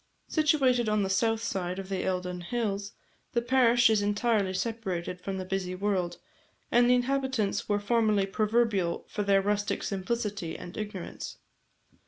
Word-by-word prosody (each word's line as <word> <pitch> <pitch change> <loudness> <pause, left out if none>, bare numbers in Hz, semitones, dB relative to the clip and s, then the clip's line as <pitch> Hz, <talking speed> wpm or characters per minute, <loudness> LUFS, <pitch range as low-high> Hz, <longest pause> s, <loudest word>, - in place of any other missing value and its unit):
Situated 270 -7 +3
on 210 -1 +2
the 190 - -1
south 225 +3 +1
side 180 -3 -2
of 195 -1 -5
the 190 -1 -2
Eildon 180 -1 -2
hills, 200 0 -2 0.4
the 235 - +2
parish 245 -1 +5
is 220 -2 +3
entirely 205 -1 +1
separated 185 -4 -3
from 195 +1 -4
the 185 - -4
busy 185 -1 -2
world, 185 -2 -1 0.5
and 240 0 +5
the 250 - +6
inhabitants 250 -6 0
were 205 0 +2
formerly 215 -2 +2
proverbial 210 -3 +1
for - - -3
their 200 -1 +3
rustic 205 0 0
simplicity 200 -3 -2
and 175 - -9
ignorance. 205 -4 -6
205 Hz, 150 wpm, -29 LUFS, 190-235 Hz, 0.5 s, the